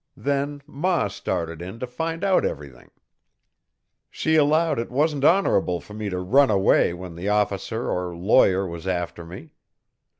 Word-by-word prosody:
Then 145 0 -2
ma 165 - -1
started 85 -4 -4
in 95 +5 -7
to 125 - -3
find 165 +8 -4
out 195 -2 +3
everything. 70 -4 -6 1.2
"She 160 - -1
allowed 155 -1 +3
it 115 - -4
wasn't 145 +2 0
honorable 120 - +3
for 105 - -14
me 105 -1 -4
to 90 - -3
run 130 +10 +3
away 95 -4 +3
when 90 0 -8
the 90 +4 -4
officer 105 +2 -1
or 90 -1 -3
lawyer 95 +1 +3
was 85 0 -7
after 90 -2 -3
me. 85 -1 -11
105 Hz, 155 wpm, -23 LUFS, 90-145 Hz, 1.2 s, out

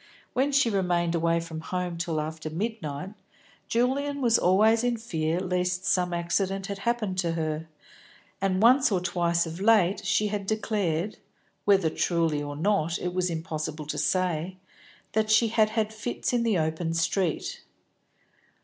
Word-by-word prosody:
When 270 +3 +1
she 275 -4 +3
remained 175 -3 +1
away 170 0 +2
from 165 -1 -6
home 180 0 -3
till 165 -2 -2
after 155 +1 -4
midnight, 180 -3 -4 0.6
Julian 275 +4 0
was 235 -4 +3
always 215 +6 +4
in 245 -1 +1
fear 165 -7 -1
lest 180 0 -1
some 180 -2 +1
accident 185 +3 -1
had 200 0 -5
happened 215 -4 -1
to 170 -2 0
her, 160 -1 -3 0.7
and 195 +1 +1
once 255 +1 +6
or 190 - +2
twice 175 -1 +1
of 165 +1 -7
late 205 -3 +3
she 205 +2 +1
had 200 -1 -3
declared 205 -4 -1 0.5
(whether 195 -6 +4
truly 165 -4 0
or 145 0 -5
not 170 0 +1
it 180 0 -3
was 180 0 0
impossible 155 -2 -4
to 150 - -3
say) 180 +3 0 0.5
that 215 0 0
she 220 +1 +4
had 215 -1 +3
had 220 -1 -1
fits 240 +4 -3
in 240 - +2
the 225 -4 +2
open 160 +1 -1
street. 165 +1 -1
185 Hz, 155 wpm, -27 LUFS, 165-215 Hz, 0.7 s, once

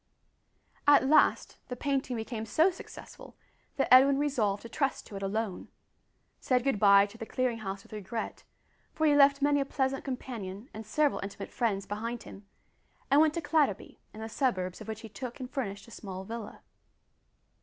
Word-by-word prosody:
At 290 -2 +6
last 300 +3 +3
the 250 - -5
painting 270 -1 -1
became 225 0 -5
so 320 - +4
successful 355 - -12 0.4
that 275 - +2
Edwin 270 +2 +7
resolved 235 -9 0
to - - -7
trust 275 +2 -1
to 205 - -10
it 195 - -5
alone 200 0 -3 0.7
said 250 -2 +1
good 270 -6 0
bye 200 -1 +7
to 210 +3 -13
the 225 - -5
Clearing 255 -3 -1
House 195 -2 -5
with - - -16
regret 215 +2 -5 0.5
for 315 - +1
he 295 -1 +5
left 280 0 +5
many 285 0 +3
a 275 - 0
pleasant 270 -1 -1
companion 235 -4 -6
and 220 0 -8
several 295 +5 +1
intimate 200 0 -7
friends 205 -5 -1
behind 230 +3 -4
him 195 0 -12 0.6
and 285 +2 +7
went 310 -1 +3
to 335 - -1
Clatterby, 290 - 0
in 215 - -10
the 220 - -4
suburbs 205 -7 -1
of 215 - -9
which 220 0 -5
he 225 - -8
took 250 +4 -7
and 255 0 -7
furnished 200 -5 -4
a - - -14
small 190 -3 -7
villa. 225 +1 -8
235 Hz, 180 wpm, -30 LUFS, 205-275 Hz, 0.7 s, Edwin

